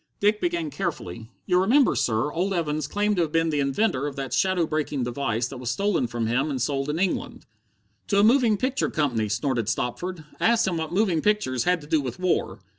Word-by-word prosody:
Dick 210 +1 +2
began 340 -3 -1
carefully: 115 - -5 0.2
"You'll 180 -1 +3
remember, 255 +8 +4
sir, 115 +5 0
old 190 +3 0
Evans 155 -3 -1
claimed 205 +4 0
to - - +3
have 160 -3 -1
been 165 0 +1
the 150 - 0
inventor 140 +1 0
of 140 - -6
that 135 -2 -4
shadow 180 +4 +2
breaking 150 -4 -2
device 120 -1 -1
that 135 - -8
was 125 -2 -4
stolen 195 -2 0
from 115 -1 -3
him 125 +7 0
and 135 -3 -2
sold 135 +2 -1
in 150 - -1
England." 185 +1 -2 0.6
"To 200 - +1
a 200 - +5
moving 230 -2 +4
picture 260 +5 0
company!" 120 -9 0
snorted 115 +1 -1
Stopford. 155 - -3
"I - - +3
asked 230 0 +3
him 175 -3 -1
what 160 -1 -3
moving 185 -4 +1
pictures 150 - +1
had 180 -2 +2
to 145 - -12
do 155 -1 +2
with 125 -3 -5
war." 180 - -1
155 Hz, 215 wpm, -25 LUFS, 130-195 Hz, 0.6 s, a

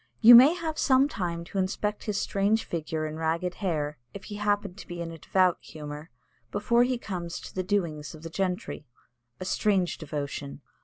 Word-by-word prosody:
You 235 +2 +10
may 265 +8 +9
have 320 -3 -4
some 265 0 +4
time 170 -10 -3
to 195 +3 -4
inspect 210 +2 -2
his 210 -3 -1
strange 205 +3 +1
figure 160 -1 -3
and 155 +1 -5
ragged 165 +3 -1
hair, 150 -6 -1 0.2
if 195 - -7
he 205 0 -7
happen 205 -2 0
to 195 - -12
be 175 0 -7
in 170 -1 -4
a 165 - -10
devout 185 +2 +2
humour, 150 +1 -8 0.4
before 235 +4 +2
he 250 0 +2
comes 180 -7 -5
to - - -10
the 185 - -1
doings 165 -7 -2
of 155 - -14
the 165 - -7
gentry. 180 -5 -3 0.5
A 185 - -5
strange 190 -3 +1
devotion! 140 -2 -5
180 Hz, 190 wpm, -27 LUFS, 160-205 Hz, 0.5 s, You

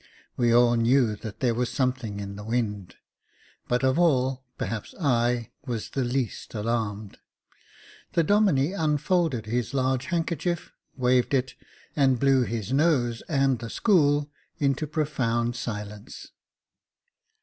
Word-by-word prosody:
We 120 -2 +2
all 120 0 +5
knew 115 -1 +3
that 105 0 -9
there 125 -3 +2
was 120 +1 -1
something 125 -6 -1
in 100 0 -6
the 105 - -8
wind; 105 -5 -2 0.7
but 125 +1 0
of 130 +5 +2
all, 130 -6 +2
perhaps 110 -2 -4
I 120 - +1 0.2
was 115 -3 -4
the 135 - -1
least 125 -2 -3
alarmed. 105 -2 -3 0.9
The 170 - +3
Domine 185 -5 +3
unfolded 155 - 0
his 120 +4 -2
large 130 -1 +1
handkerchief, 170 0 -2 0.3
waved 125 +1 +2
it, 130 -1 0 0.4
and 135 -4 +3
blew 135 -1 +4
his 115 -1 -2
nose 135 -6 +2
and 135 -5 +2
the 115 0 -6
school 145 - +2 0.3
into 140 +1 0
profound 125 -6 -1
silence. 105 -3 -7
125 Hz, 125 wpm, -26 LUFS, 115-145 Hz, 0.9 s, all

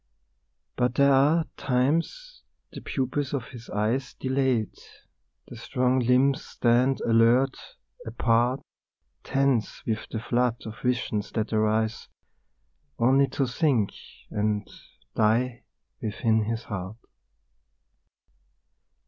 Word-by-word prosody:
But 125 -1 +1
there 140 0 +5
are 150 +5 +4
times 165 - -1 0.3
the - - -9
pupils 135 +1 -2
of 130 -4 -5
his 120 -3 -11
eyes 110 +6 -1
Dilate, 130 -5 -1 0.7
the - - -10
strong 125 +1 0
limbs 130 +3 +3
stand 125 +3 +1
alert, 120 +4 +3 0.5
apart, 120 +3 +1 0.6
Tense 135 -4 0
with 110 -1 -2
the - - -4
flood 120 +1 +1
of 110 -1 -8
visions 120 -4 -1
that 110 0 -2
arise 110 +1 0 0.9
Only 135 +4 +4
to 135 - -1
sink 125 -5 +1 0.4
and 105 0 -1 0.5
die 115 +3 +1 0.4
within 110 0 0
his 115 +2 -3
heart. 100 +1 -6
125 Hz, 100 wpm, -26 LUFS, 110-135 Hz, 0.9 s, there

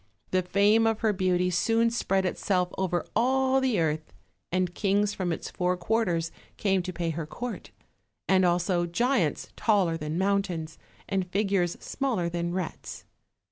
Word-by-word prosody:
The 185 - +3
fame 205 +5 +3
of 225 -1 0
her 220 -2 +2
beauty 180 -1 +1
soon 230 +6 +2
spread 195 -5 0
itself 180 -1 0
over 180 -2 -1
all 265 +3 +3
the 255 -7 +1
earth, 155 -1 -1 0.4
and 180 -1 0
kings 205 +2 +1
from 185 -4 -2
its 165 - -4
four 180 0 0
quarters 175 -4 0 0.3
came 195 -2 +2
to 185 +1 -5
pay 170 -2 -2
her 160 -1 -4
court; 240 +10 -6 0.6
as 190 -1 +4
also 175 0 +2
giants 210 - 0
taller 195 -7 +2
than 150 +1 -4
mountains, 185 -5 -1 0.3
and 190 -2 -1
figures 195 -3 +1
smaller 235 -11 -1
than 170 0 -2
rats. 180 -2 -5
185 Hz, 150 wpm, -27 LUFS, 175-210 Hz, 0.6 s, as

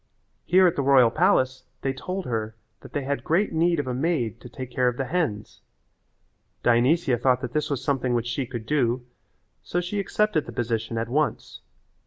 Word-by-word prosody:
Here 185 +1 +5
at 175 - +3
the - - 0
royal 130 -4 +5
palace 130 +2 +2 0.2
they 135 - 0
told 185 +8 -5
her 110 -2 -3 0.2
that - - -13
they 145 - -1
had 140 +1 -2
great 180 +5 +1
need 170 0 +2
of 145 - -1
a 130 - -2
maid 125 -6 -1
to 125 - -10
take 130 -1 -8
care 125 -1 +1
of 125 0 0
the 135 - -1
hens. 140 -11 -2 1.0
Dionysia 125 +2 +3
thought 125 0 +2
that 125 -2 -5
this 150 -1 0
was 140 -4 -2
something 130 -4 0
which 120 -1 0
she 125 +1 -2
could 120 -3 -6
do, 125 -3 0 0.6
so 175 - -2
she 180 +4 -3
accepted 200 -4 0
the - - -6
position 115 -1 -2
at 115 0 -1
once. 145 +5 -2
130 Hz, 195 wpm, -25 LUFS, 120-155 Hz, 1.0 s, Here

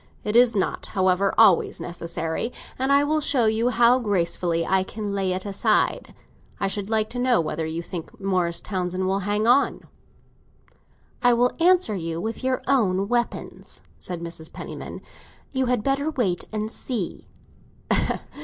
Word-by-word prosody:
It 210 - -2
is 240 -1 +6
not, 195 - -1
however, 190 +1 +3
always 210 -6 +5
necessary, 170 +4 -4 0.3
and 265 +1 +1
I 280 +1 +5
will 305 +1 +1
show 265 -5 +2
you 220 +2 +2
how 240 +1 +4
gracefully 175 -5 0
I 190 0 +3
can 205 +1 -5
lay 195 -2 0
it 185 +2 -2
aside. 200 -1 0 0.4
I - - 0
should 200 0 -3
like 220 -1 +2
to 245 - -4
know 250 -1 +3
whether 160 0 -2
you 165 +2 -4
think 170 -1 -8
Morris 185 -3 0
Townsend 185 -1 -2
will 190 +1 +1
hang 210 +1 +1
on." 255 +4 +3 1.4
"I 245 -1 +5
will 245 +1 +3
answer 355 -7 +4
you 165 -3 -3
with 225 +7 -4
your 260 0 0
own 200 -7 +2
weapons," 240 -1 -3 0.2
said 175 -2 -5
Mrs. 165 -1 -6
Penniman. - - -8 0.5
"You 260 -2 0
had 245 -3 +1
better 275 +2 +1
wait 220 - -1
and 215 0 -3
see!" 230 -10 -4
210 Hz, 155 wpm, -24 LUFS, 180-245 Hz, 1.4 s, is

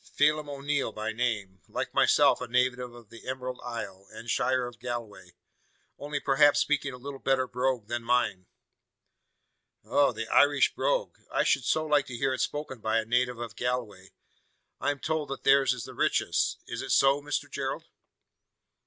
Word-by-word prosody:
Phelim 150 0 +2
O'Neal 140 -2 -1
by 110 +1 -3
name 105 -6 -2
like - - -4
myself - - +4
a 125 - -4
native 125 +1 +2 0.2
of 120 -3 -15
the 115 - -13
Emerald 130 -1 -4
Isle, 100 -5 -6
and 115 +1 -6
shire 130 -1 +1
of 120 -1 -9
Galway; 110 -7 -6 0.7
only 145 0 -3
perhaps 140 +1 +4
speaking 145 -2 +1
a 125 - -9
little 135 +2 -8
better 135 -1 +2
brogue 125 -2 -1
than 120 +1 -3
mine." 115 -6 +1 1.4
"Oh! 130 +6 +3
the 115 -1 -5
Irish 145 0 +4
brogue. - - -1
I - - +2
should - - +2
so 155 0 +1
like 150 -2 +2
to 120 - -6
hear 135 +1 +1
it 130 - -2
spoken 145 -4 -3
by 110 +1 0
a 110 - 0
native 125 +1 +1
of 115 -3 -6
Galway. 110 -7 -3 0.7
I - - 0
am 145 - -1
told 155 0 -2
that 135 - -5
theirs 135 -1 +5
is 125 -2 -3
the - - -9
richest. - - 0
Is - - -5
it - - -6
so, 135 +1 +4
Mr 145 +1 -2
Gerald?" - - -4
125 Hz, 175 wpm, -28 LUFS, 115-140 Hz, 1.4 s, theirs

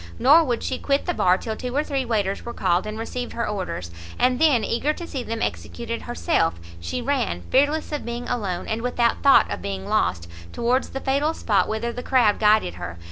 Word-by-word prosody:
Nor 300 +6 +6
would 240 -4 -1
she 260 - -2
quit 280 0 0
the 355 - 0
bar, 180 - +3
till 220 +2 -4
two 250 +3 -5
or 295 - +2
three 275 -3 -2
waiters 205 -4 -1
were 235 - -7
called, 185 +1 +1
and 215 0 -5
received 245 +2 -5
her 235 - -2
orders. 185 - -4 0.3
And 250 0 +2
then, 290 -8 +4
eager 285 +6 0
to 340 - -7
see 275 -6 -4
them 230 -1 -3
executed 85 0 -4
herself, 85 0 0 0.2
she 165 - -4
ran, 240 - -1
fearless 290 +4 +2
of 295 - -3
being 235 +1 -5
alone, 200 -8 -2
and 220 +1 -2
without 240 -1 +1
thought 280 -1 +5
of - - -4
being 195 -1 -4
lost, 90 - 0 0.3
towards 245 +3 0
the 270 - -5
fatal 285 +4 +1
spot 205 -3 +1
whither 225 +2 -2
the 245 - -5
crowd 245 -5 +3
guided 210 - +3
her. 85 -1 -6
235 Hz, 210 wpm, -23 LUFS, 200-265 Hz, 0.3 s, Nor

